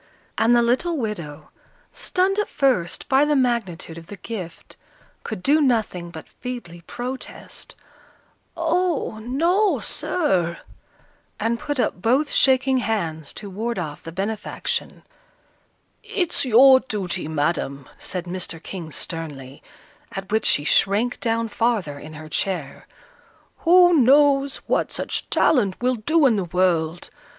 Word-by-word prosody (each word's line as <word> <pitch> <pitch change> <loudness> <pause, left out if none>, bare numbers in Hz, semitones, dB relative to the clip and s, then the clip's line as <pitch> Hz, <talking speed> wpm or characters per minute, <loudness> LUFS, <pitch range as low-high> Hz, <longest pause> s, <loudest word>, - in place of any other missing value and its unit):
And 230 +2 +4
the 240 - +4
little 285 +8 +1
widow, 170 - -5 0.4
stunned 380 +2 0
at 420 - -1
first 250 - 0
by 270 +1 +4
the 295 0 +2
magnitude 215 -11 -1
of 165 - -15
the 205 - -9
gift, 180 -4 -8 0.5
could 215 -5 -6
do 300 +3 +4
nothing 220 -10 0
but 160 -2 -10
feebly 240 -10 -7
protest, 255 +2 -7 0.8
"Oh, 335 -8 0
no, 335 - +2
sir!" 185 - 0 0.8
and 230 +2 0
put 290 -2 -3
up 180 - 0
both 265 +8 +2
shaking 265 0 +3
hands 170 - -2
to 205 - -8
ward 225 +5 -3
off 155 -5 -5
the 165 - -8
benefaction. 200 +4 -3 1.0
"It's 350 -7 -1
your 260 +2 +7
duty, 190 - -3
Madam," 145 -3 -2
said 180 -1 -4
Mr. 175 -2 -5
King, 170 -5 -7
sternly, 145 -5 -6 0.5
at 195 0 -6
which 220 0 +1
she 145 - +3
shrank 205 +9 +2
down 230 0 0
farther 210 -10 -1
in 155 +2 -10
her 155 0 -9
chair. 160 -3 -3 0.7
"Who 355 +1 +6
knows 275 0 +4
what - - 0
such - - -3
talent 205 -10 +2
will 250 +1 +1
do 305 +8 +2
in 235 -5 +4
the 190 - -1
world? 175 -2 0
220 Hz, 130 wpm, -23 LUFS, 170-265 Hz, 1.0 s, your